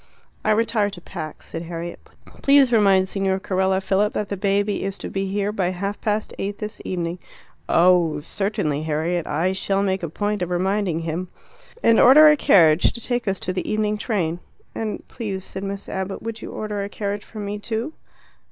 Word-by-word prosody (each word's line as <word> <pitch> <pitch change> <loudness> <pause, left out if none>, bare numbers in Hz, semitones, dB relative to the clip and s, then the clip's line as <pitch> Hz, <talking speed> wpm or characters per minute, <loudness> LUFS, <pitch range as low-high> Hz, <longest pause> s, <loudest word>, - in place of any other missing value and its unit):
"I - - 0
retire 215 -1 +2
to 195 -3 -9
pack," 155 -2 -8
said 165 - -6
Harriet. 170 0 -6 0.4
"Please 275 -3 +5
remind 195 -4 +4
Signor 190 0 0
Carella, 190 0 +1
Philip, 195 +2 +1
that 210 - -2
the 200 - -2
baby 200 +1 0
is 195 0 -3
to - - -6
be 195 0 -2
here 200 +1 -1
by 190 -4 0
half 195 +3 -4
past 210 0 -1
eight 200 +1 -3
this 210 -1 -6
evening." 175 -1 -3 0.5
"Oh, 170 -3 +4
certainly, 155 -3 -2
Harriet. 160 +2 -1
I 170 +5 +1
shall 195 +1 0
make 190 -1 0
a 170 - -3
point 205 +4 -2
of 180 - -1
reminding 185 -1 0
him." 165 +3 -3 0.6
"And 230 - +5
order 300 +5 +9
a 300 - +6
carriage 165 - +5
to - - -7
take 240 0 -2
us 195 -1 0
to 185 - -2
the 180 - -3
evening 215 0 +1
train." 175 -8 -1 0.3
"And 220 -1 -4
please," 200 -6 -5
said 190 - -6
Miss 200 0 -5
Abbott, 190 0 -4
"would 225 0 -5
you - - -7
order 210 -2 -3
a 200 - -5
carriage 205 0 -3
for 220 - -13
me 205 0 -4
too?" 230 +7 -3
195 Hz, 190 wpm, -22 LUFS, 180-210 Hz, 0.6 s, order